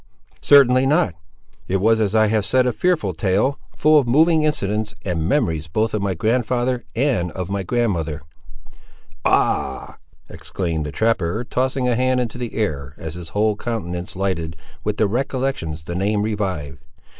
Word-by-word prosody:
"Certainly 135 -2 +6
not; 150 - +2 0.5
it 95 - +1
was, 110 +3 +3
as 105 -1 0
I 110 0 +5
have 110 -1 +1
said, 125 +6 +3
a 125 - +1
fearful 155 - 0
tale, 100 - 0 0.2
full 155 0 +5
of 130 - -1
moving 160 +6 +4
incidents, 105 -8 0
and 90 -4 -1
the - - -1
memories 80 - 0
both 110 +7 -1
of 105 - -1
my 100 -2 -1
grandfather 120 +4 0
and 115 - +1
of 95 0 -5
my 100 0 -1
grandmother—" 85 - -1 1.0
"Ah!" - - 0 0.3
exclaimed 80 -1 -3
the - - -5
trapper, 110 +1 0
tossing 130 +1 -1
a 125 - +2
hand 130 +1 +2
into 125 0 -3
the 120 -2 -5
air 70 -10 -2
as 80 -1 -6
his 85 -1 -8
whole 105 +2 +1
countenance 90 -6 -4
lighted 85 -4 -2 0.3
with 105 0 -2
the 110 - +3
recollections 125 - -2
the 85 - -6
name 100 +3 0
revived. 95 -9 -3
105 Hz, 165 wpm, -21 LUFS, 85-125 Hz, 1.0 s, Certainly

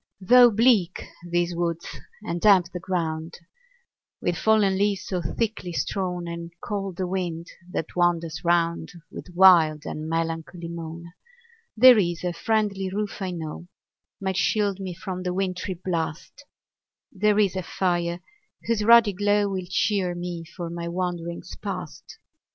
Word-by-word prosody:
Though 245 +5 +7
bleak 215 -5 +2 0.2
these 175 0 -1
woods, 170 -1 -3 0.3
and 170 -4 -3
damp 190 -4 +5
the 180 - -4
ground 165 -3 -3 0.8
With 175 - -1
fallen 210 0 +3
leaves 200 0 0
so 180 -2 -2
thickly 195 +2 -3
strown, 180 -1 -2
And 170 0 -6
cold 195 -3 -4
the 185 - -1
wind 175 -3 -3 0.2
that 165 - -4
wanders 170 -2 0
round 170 -1 +1 0.2
With - - -9
wild 165 -5 +6
and 155 +1 -5
melancholy 165 +1 -3
moan; 170 0 -8 0.6
There 250 0 +9
IS 175 -3 -1
a 180 -1 -1
friendly 200 0 0
roof, 205 +1 -4
I 190 - -2
know, 170 -1 -6 0.5
Might 190 -2 -2
shield 200 -1 +1
me 185 -2 -5
from 185 -1 -5
the 180 0 -3
wintry 185 0 -2
blast; 170 - -4 0.7
There 210 +1 +2
is 200 -3 +2
a 185 - -1
fire, 175 -1 -1 0.4
whose 230 -2 0
ruddy 230 -2 +6
glow 205 +1 +2
Will 185 -2 -4
cheer 190 -2 0
me 175 -1 -5
for 170 0 -7
my 170 0 -5
wanderings 170 -1 -4
past. - - -7
180 Hz, 145 wpm, -25 LUFS, 170-195 Hz, 0.8 s, There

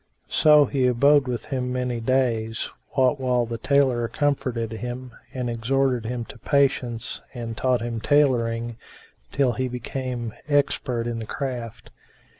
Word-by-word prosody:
So 150 -1 +6
he 130 -1 +1
abode 140 +3 +4
with 120 -3 -3
him 125 -2 -2
many 125 -1 -2
days, 115 -2 0 0.2
what 130 +1 +3
while 125 -2 +1
the 115 0 -5
tailor 130 -3 +2
comforted 130 -5 -1
him 125 +3 -6 0.2
and 125 -2 -3
exhorted 120 0 0
him 120 -2 -3
to - - -12
patience 130 -5 0
and 115 -2 -5
taught 125 +1 +1
him 115 -2 -3
tailoring, 120 -5 +2 0.5
till 135 -3 +2
he 130 +1 -2
became 125 -1 -4
expert 130 -5 +1
in 120 -1 -3
the 110 - -6
craft. 120 -5 -5
125 Hz, 140 wpm, -24 LUFS, 115-135 Hz, 0.5 s, So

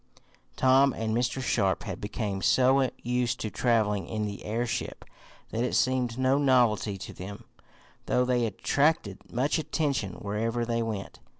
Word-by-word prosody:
Tom 130 +1 +4
and 110 0 -2
Mr. 120 +2 0
Sharp 100 -6 +1
had - - -6
become 105 -2 -3
so 130 +4 +4
used 125 0 0
to 110 - -3
traveling 110 -5 +1
in 110 -1 -2
the 100 -1 -6
airship 115 +2 -3 0.5
that 115 - -1
it 125 - -1
seemed 130 -2 +1
no 130 +2 +2
novelty 120 -7 +3
to - - -8
them, 100 +3 -8 0.6
though 125 - +2
they 125 -2 +1
attracted 125 0 0
much 140 +7 +1
attention 145 - -1
wherever 115 +5 -2
they 115 0 -1
went. 110 -3 -5
120 Hz, 145 wpm, -28 LUFS, 105-130 Hz, 0.6 s, Tom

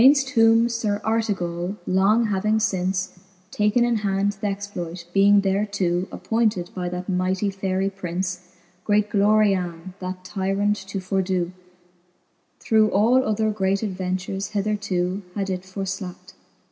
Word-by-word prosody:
Gainft 270 +1 +6
whom 225 -2 +5
Sir 225 -3 -1
Artegally 195 -5 -1
long 200 +5 +3
having 210 +1 +1
fince 185 -2 -1 0.3
Taken 210 +3 +2
in 240 -1 +1
hand 200 -1 0
th'exploit, 195 -4 -4
being 200 0 +5
theretoo 195 -2 0
Appointed 215 -6 0
by 180 -1 -3
that 180 +1 -5
mightie 185 +1 0
Faerie 195 0 -1
Prince, 185 -1 -3 0.4
Great 210 0 +1
Gloriane, 195 -4 +2
that 185 0 -6
tyrant 195 +2 0
to 195 0 -5
fordoo, 185 -2 -1 1.1
Through 215 -1 +3
other 220 0 +3
great 195 0 0
adventures 190 0 -3
hethertoo 200 -2 -1
Had 195 -2 -2
it 180 -1 -2
forflackt. 190 -1 -6
195 Hz, 120 wpm, -23 LUFS, 185-210 Hz, 1.1 s, Gainft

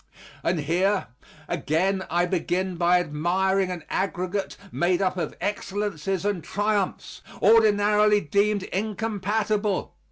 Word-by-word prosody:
And 170 -2 0
here, 185 +5 +1 0.4
again 190 +5 0
I 175 +1 +2
begin 185 +1 -1
by 175 +1 +3
admiring 180 +4 0
an 180 -3 -5
aggregate 190 +1 -2
made 175 +1 +1
up 190 -2 +1
of 180 - -3
excellences 195 -3 -2
and 200 -5 -1
triumphs, 205 -1 -2 0.2
ordinarily 210 -1 +5
deemed 200 +4 +1
incompatible. 210 0 -1
190 Hz, 105 wpm, -25 LUFS, 180-205 Hz, 0.4 s, ordinarily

